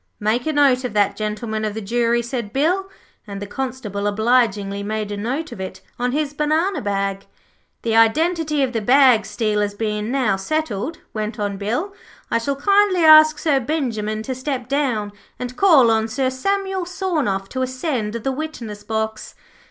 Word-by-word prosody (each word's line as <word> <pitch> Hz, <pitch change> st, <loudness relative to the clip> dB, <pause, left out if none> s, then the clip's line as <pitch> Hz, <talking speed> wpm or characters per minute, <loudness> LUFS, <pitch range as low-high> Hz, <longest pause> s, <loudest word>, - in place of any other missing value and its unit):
'Make 220 Hz, +6 st, 0 dB
a 310 Hz, -, 0 dB
note 275 Hz, -3 st, +3 dB
of 250 Hz, -4 st, -4 dB
that, 205 Hz, -1 st, +2 dB
Gentlemen 215 Hz, +1 st, -3 dB
of 215 Hz, -1 st, -2 dB
the -, -, -3 dB
Jury,' 235 Hz, +2 st, +1 dB
said 235 Hz, -3 st, -4 dB
Bill, 355 Hz, -, 0 dB, 0.4 s
and 200 Hz, -1 st, -6 dB
the 205 Hz, -, -5 dB
Constable 220 Hz, -4 st, -4 dB
obligingly 210 Hz, -2 st, +1 dB
made 210 Hz, 0 st, -3 dB
a -, -, -2 dB
note 265 Hz, +9 st, -3 dB
of 190 Hz, -, -7 dB
it 190 Hz, 0 st, -7 dB, 0.2 s
on 245 Hz, 0 st, 0 dB
his 295 Hz, +1 st, -1 dB
banana 310 Hz, +6 st, 0 dB
bag. 195 Hz, -1 st, -2 dB, 0.6 s
'The 225 Hz, -1 st, 0 dB
identity 305 Hz, +6 st, +3 dB
of 260 Hz, -1 st, -1 dB
the 225 Hz, -, -1 dB
bag 250 Hz, -1 st, +5 dB
stealers 210 Hz, -2 st, -1 dB
bein' 210 Hz, 0 st, -2 dB
now 250 Hz, -8 st, +1 dB
settled,' 310 Hz, +4 st, -2 dB, 0.2 s
went 215 Hz, +1 st, -3 dB
on 205 Hz, -2 st, -2 dB
Bill, 245 Hz, -, -2 dB, 0.4 s
'I -, -, +3 dB
shall 275 Hz, +5 st, -2 dB
kindly 395 Hz, +3 st, +3 dB
ask 310 Hz, -1 st, +8 dB
Sir 290 Hz, -4 st, +2 dB
Benjimen 230 Hz, -6 st, -2 dB
to 260 Hz, -, -3 dB
step 260 Hz, -1 st, -4 dB
down, 250 Hz, -7 st, -1 dB, 0.3 s
and 250 Hz, 0 st, -6 dB
call 295 Hz, -11 st, +5 dB
on 220 Hz, 0 st, +1 dB
Sir 255 Hz, +3 st, -1 dB
Samuel 385 Hz, +6 st, -1 dB
Sawnoff 305 Hz, -, -1 dB
to 260 Hz, -, -3 dB
ascend 255 Hz, -4 st, -2 dB
the 235 Hz, +4 st, -2 dB
witness 255 Hz, -8 st, -6 dB
box.' 220 Hz, 0 st, -3 dB
240 Hz, 170 wpm, -21 LUFS, 210-295 Hz, 0.6 s, ask